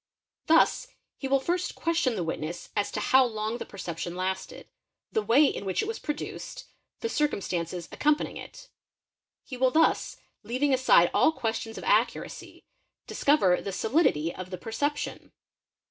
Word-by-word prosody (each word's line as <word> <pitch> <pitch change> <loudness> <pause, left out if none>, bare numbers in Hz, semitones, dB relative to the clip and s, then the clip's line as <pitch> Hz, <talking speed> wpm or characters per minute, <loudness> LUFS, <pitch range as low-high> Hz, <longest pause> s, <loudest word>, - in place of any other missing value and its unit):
Thus 325 +1 +4 0.3
he 270 - -3
will 275 0 +3
first 350 +6 -2
question 330 -7 0
the 185 - -2
witness 165 +1 -5
as 205 -1 0
to - - -1
how 265 0 +5
long 220 -1 -2
the - - -6
perception 175 -3 -6
lasted, 190 +1 -4 0.4
the 440 - +1
way 285 - +5
in 270 - -1
which 190 - -1
it - - -4
was 450 - -4
produced, 295 - -6 0.4
the 460 - -1
circumstances 180 - -2
accompanying 300 +1 0
it; - - -11 0.7
he 255 - -8
will 260 +1 +3
thus, 320 +5 +2 0.2
leaving 265 +4 0
aside 255 -9 +5
all - - +4
ques 225 -7 -2
tions 225 0 -8
of - - -7
accuracy, - - -1 0.4
discover 200 -12 +2
the 200 - -4
"solidity'' 190 - +1
of 185 0 -8
the 185 - -5
perception. 285 - -3
235 Hz, 155 wpm, -27 LUFS, 185-295 Hz, 0.7 s, how